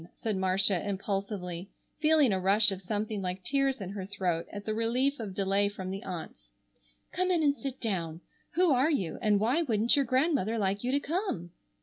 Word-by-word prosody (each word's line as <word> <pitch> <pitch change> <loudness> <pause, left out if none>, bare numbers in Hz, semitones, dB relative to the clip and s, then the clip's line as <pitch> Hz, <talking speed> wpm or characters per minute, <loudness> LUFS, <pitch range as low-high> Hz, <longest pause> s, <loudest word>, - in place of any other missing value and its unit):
said 220 -3 -2
Marcia 190 0 +3
impulsively, 195 -2 -3 0.3
feeling 305 -6 +4
a 190 - +1
rush 200 +3 +4
of 190 -1 -5
something 210 +2 -2
like 185 0 -4
tears 275 +2 +1
in 190 -2 -5
her 200 -1 -5
throat 185 -4 -2
at 205 -1 -7
the 215 - -1
relief 245 +5 +1
of 205 -5 -5
delay 200 +1 +2
from 190 -2 -6
the 195 +1 -4
aunts. 165 - -7 0.6
"Come 365 0 0
in 345 -3 +2
and 285 -1 +3
sit 270 -2 -6
down. 170 -7 -2 0.3
Who 355 -1 +4
are 260 +4 +3
you, 195 - -1
and 210 -2 +3
why 245 +10 +2
wouldn't 230 -6 +2
your 280 -1 +2
Grandmother 255 - +1
like 200 0 0
you 250 - 0
to 280 - +2
come?" 290 - -3
205 Hz, 195 wpm, -30 LUFS, 190-265 Hz, 0.6 s, feeling